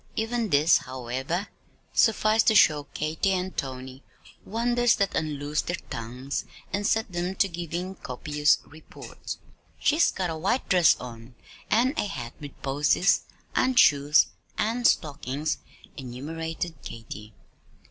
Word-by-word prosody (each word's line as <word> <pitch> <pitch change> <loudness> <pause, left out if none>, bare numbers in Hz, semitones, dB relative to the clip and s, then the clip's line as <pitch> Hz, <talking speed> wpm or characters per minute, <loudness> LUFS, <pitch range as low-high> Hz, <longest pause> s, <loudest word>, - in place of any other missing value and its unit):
Even 225 0 -1
this, 150 +2 +5
however, 130 - -4 0.5
sufficed 220 0 +3
to 220 - +5
show 150 -7 +5
Katy 160 +5 0
and 185 0 -2
Tony 130 0 -5 0.4
wonders 240 +2 +2
that 200 -1 0
unloosed 150 -1 -2
their 175 - 0 0.2
tongues 125 +4 -4 0.3
and 205 +1 0
set 220 -3 +1
them 175 +2 -2
to 195 - +3
giving 175 +1 -4
copious 150 -1 +1
reports. 160 +2 -9 0.4
"She's 310 +3 +4
got 180 -3 -2
a - - -3
white 195 +11 0
dress 180 -5 +5
on, 120 0 -10 0.3
an' 245 +5 +3
a - - +1
hat 120 -10 -6
with 145 -2 -10
posies, 145 +7 +2 0.3
an' 260 0 +2
shoes 145 -7 +6 0.3
an' 235 +3 0
stockings," 145 - +1 0.4
enumerated 160 +5 -5
Katy. 110 -2 -9
160 Hz, 125 wpm, -26 LUFS, 135-195 Hz, 0.5 s, shoes